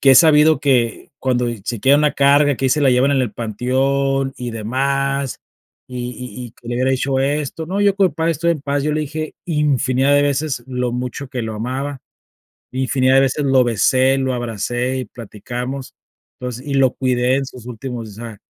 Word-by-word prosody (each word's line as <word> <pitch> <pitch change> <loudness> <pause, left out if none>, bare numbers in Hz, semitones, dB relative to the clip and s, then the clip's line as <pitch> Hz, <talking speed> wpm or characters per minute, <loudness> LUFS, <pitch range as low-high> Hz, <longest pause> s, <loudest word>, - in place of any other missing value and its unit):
que 135 - +6
he - - +6
sabido 155 -1 +6
que, 125 -5 +1
cuando, 125 -2 0
eh, 115 -3 -5
se 120 -2 -3
quedan 140 +5 +5
la 150 - +3
carga, 140 +1 +4
que 135 - 0
ahí - - +3
se 150 +4 +2
la 140 -2 +4
llevan 125 +3 +3
en 135 - +2
el 120 -5 -3
panteón 135 +5 0
y 125 -1 -5
demás, 135 +4 -1 0.5
y 125 -1 -5
y 125 0 -8
y - - -13
que 120 - -14
le 120 - -2
hubiera 130 +2 +1
dicho 135 +1 0
esto. 145 +3 -1
No, 190 +4 -2
yo 200 -1 +4
con 200 -1 +4
mi 155 - -11
padre 165 +2 0
estoy 165 +2 0
en 155 - -5
paz, 140 0 -1
yo 150 +1 0
le 155 - 0
dije 155 +1 -5
infinidad 140 -4 +2
de 145 - +4
veces 145 -2 -1
lo 125 -2 -2
mucho 125 +2 -4
que 130 -2 -4
lo 110 -1 -4
amaba, 130 +5 -4 0.7
infinidad 130 0 +2
de 135 - +6
veces 135 +2 0
lo 135 -1 +4
besé, 130 +3 +3
lo 130 -1 0
abracé 120 +2 -2
y 130 - -4
platicamos. 125 +4 -7 0.5
Entonces, 125 +1 -6
y 140 - -2
lo 135 -2 +4
cuidé 125 -1 +1
en 135 0 -1
sus 125 -3 -11
últimos 120 -1 -6
O - - -11
sea, 110 0 -9
130 Hz, 210 wpm, -19 LUFS, 125-140 Hz, 0.7 s, que